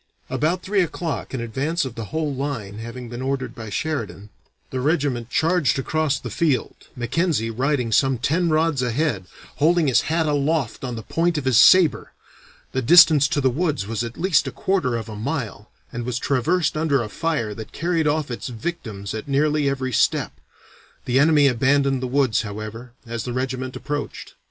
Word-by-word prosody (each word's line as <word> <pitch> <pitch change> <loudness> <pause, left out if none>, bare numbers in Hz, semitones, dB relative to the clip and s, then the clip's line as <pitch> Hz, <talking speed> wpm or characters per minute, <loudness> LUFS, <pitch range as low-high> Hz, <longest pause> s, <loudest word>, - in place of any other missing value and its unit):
"About 155 +8 0
three 200 0 +1
o'clock, 165 -2 -3
an 130 - -3
advance 135 +8 -1
of 130 - -6
the 115 -1 -6
whole 155 +3 -2
line 125 -7 -4
having 115 +2 -7
been 120 +1 -7
ordered 130 -2 -2
by 110 -3 -8
Sheridan, 105 -4 -4 0.4
the 130 - -2
regiment 140 -5 0
charged 165 0 +2
across 150 +1 0
the 120 -2 -7
field, 145 -2 0 0.2
Mackenzie 125 -1 0
riding 125 0 0
some 135 +3 +3
ten 165 +8 +1
rods 155 -3 +2
ahead, 125 - -1 0.3
holding 165 +2 +3
his 130 -4 +4
hat 165 0 +1
aloft 145 -3 0
on 125 -2 -3
the 110 - -6
point 165 +4 0
of 145 - -3
his 130 -4 +4
saber. 185 -4 +5 0.6
The 130 - -1
distance 155 0 +7
to 145 -1 -1
the 130 -1 +3
woods 150 - -1
was 115 +2 -3
at 115 0 -7
least 165 -6 +2
a - - -3
quarter 140 -1 0
of 115 -1 -6
a 110 - -7
mile, 110 -2 -4 0.2
and 120 0 -4
was 120 0 -2
traversed 150 +6 +1
under 150 -5 +1
a - - -5
fire 135 -5 -2
that 110 0 -9
carried 165 -2 0
off 150 -2 0
its 120 - -5
victims 110 - -5
at 110 +3 -6
nearly 145 +1 +2
every 130 -2 -3
step. - - +2 0.7
The 125 +2 +2
enemy 150 0 +5
abandoned 135 +1 +2
the 130 - -2
woods, 130 -3 +2
however, 110 +3 -7
as 115 -2 -4
the 125 - -4
regiment 130 0 -3
approached. 145 +2 -5
135 Hz, 180 wpm, -22 LUFS, 120-155 Hz, 0.7 s, distance